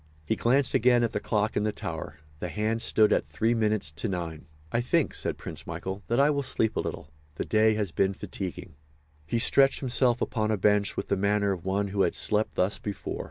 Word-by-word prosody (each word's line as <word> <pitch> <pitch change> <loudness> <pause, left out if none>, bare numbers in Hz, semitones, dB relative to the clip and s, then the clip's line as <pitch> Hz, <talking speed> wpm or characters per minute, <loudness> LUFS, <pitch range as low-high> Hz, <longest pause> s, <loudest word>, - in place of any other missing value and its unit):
He - - 0
glanced 130 +3 +2
again 120 0 +4
at 115 - 0
the - - -2
clock 105 0 -1
in - - +1
the 105 +1 0
tower. 80 -5 -6 0.2
The 90 - -4
hands 110 +3 -1
stood 110 -1 +4
at - - 0
three 115 +1 +1
minutes 110 -8 0
to 75 +6 -4
nine. 85 -5 -5 0.2
"I 120 - +1
think," 155 +5 +1
said - - -2
Prince - - -8
Michael, 95 +1 -5
"that 120 +3 +1
I 145 +2 +5
will 140 -1 0
sleep 115 -4 0
a - - 0
little. 75 - -5 0.2
The - - -3
day 110 0 +3
has 105 -4 -2
been 95 +3 +1
fatiguing." 90 -4 -6 0.5
He 115 - 0
stretched 135 +3 +4
himself 125 -2 +2
upon 110 -2 -1
a 110 - +1
bench 105 +1 +2
with - - -4
the 100 - +1
manner 100 +1 +1
of 90 -3 -5
one 100 +1 0
who 100 0 -1
had - - +1
slept 105 +1 +1
thus 95 +3 0
before. 100 -2 -5
105 Hz, 220 wpm, -27 LUFS, 95-115 Hz, 0.5 s, I